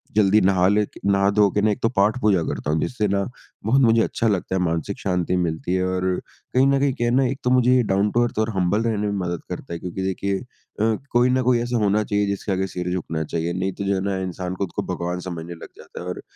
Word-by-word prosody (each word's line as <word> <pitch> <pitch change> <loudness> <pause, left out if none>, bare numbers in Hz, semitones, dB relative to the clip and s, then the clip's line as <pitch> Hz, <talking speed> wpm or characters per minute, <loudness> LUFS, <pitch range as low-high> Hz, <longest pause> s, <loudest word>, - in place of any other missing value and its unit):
जल्दी 105 0 +5
नहा 95 -1 +3
ले 105 +1 +3
के - - -16
नहा 100 0 +3
धो 100 -1 +4
के 105 - 0
ना, 110 - +3
एक 105 - -3
तो 115 - +2
पाठ-पूजा 105 -3 +2
करता 75 - -3
हूँ, 80 - +1
जिससे 110 -4 -1
ना 100 0 +1 0.4
बहुत 130 +5 +4
मुझे 115 -2 +5
अच्छा 115 - -1
लगता 95 -3 0
है 95 - +1
मानसिक 85 +3 -1
शांति 90 -1 0
मिलती 85 +1 -1
है 95 0 +1
और 95 0 -1 0.5
कहीं 130 +1 +4
न 140 0 +3
कहीं 140 -1 +2
क्या 120 -2 -1
है 120 - +1
ना, 135 0 +4
एक 130 +2 -2
तो 125 - +1
मुझे 125 0 +4
ये 125 - +4
डाउन 100 +2 +2
टू 120 0 +3
अर्थ 120 - -2
और 110 +1 +1
हम्बल 95 +3 +1
रहने 105 -2 0
में 100 - -1
मदद 85 -2 -3
करता 85 - -6
है, 85 - -4
क्योंकि 90 +2 -5
देखिए 95 +1 -1
अ, 115 -3 -3 0.2
कोई 120 +1 +4
न 130 +1 +2
कोई 125 -1 +3
ऐसा 120 0 -1
होना 105 +1 +2
चाहिए 105 0 0
जिसके 100 0 -3
आगे 95 0 0
सिर 90 -1 -4
झुकना 80 -3 -2
चाहिए। 85 +2 -2
नहीं 95 +2 -1
तो 100 - -5
जो 100 0 +1
है 95 - -1
ना 100 -1 -1
इंसान 90 0 -4
खुद 95 -1 -3
को - - 0
भगवान 90 0 -3
समझने 85 -1 -6
लग 80 - -11
जाता - - -11
है - - -7
और 90 - -5
100 Hz, 270 wpm, -23 LUFS, 90-115 Hz, 0.5 s, जल्दी